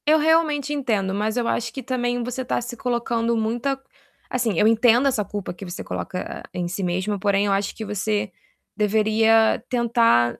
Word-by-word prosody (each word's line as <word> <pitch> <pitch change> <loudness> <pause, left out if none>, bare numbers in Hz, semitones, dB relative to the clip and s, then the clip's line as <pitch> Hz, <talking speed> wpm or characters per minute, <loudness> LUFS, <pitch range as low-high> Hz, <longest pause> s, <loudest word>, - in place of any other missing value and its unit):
Eu 310 +1 +6
realmente 305 -2 +2
entendo, 215 -9 0
mas 215 +3 -1
eu 240 -1 0
acho 235 -1 -1
que 265 +3 -7
também 245 -1 -1
você 250 +2 -4
tá 250 - -1
se 240 0 -6
colocando 235 -1 -1
muita 240 +5 -1 0.5
assim, 235 -7 0
eu 210 - +4
entendo 235 +3 +4
essa 225 -6 0
culpa 205 -3 -5
que 195 - -9
você 175 0 -6
coloca 180 - -5
em 180 -1 -2
si 190 +3 -4
mesma, 185 +3 -1
porém 200 +1 +2
eu - - +1
acho 195 0 0
que 220 - -6
você 210 0 -1 0.4
deveria 220 +1 +3
tentar 230 - +3
225 Hz, 180 wpm, -23 LUFS, 205-245 Hz, 0.5 s, Eu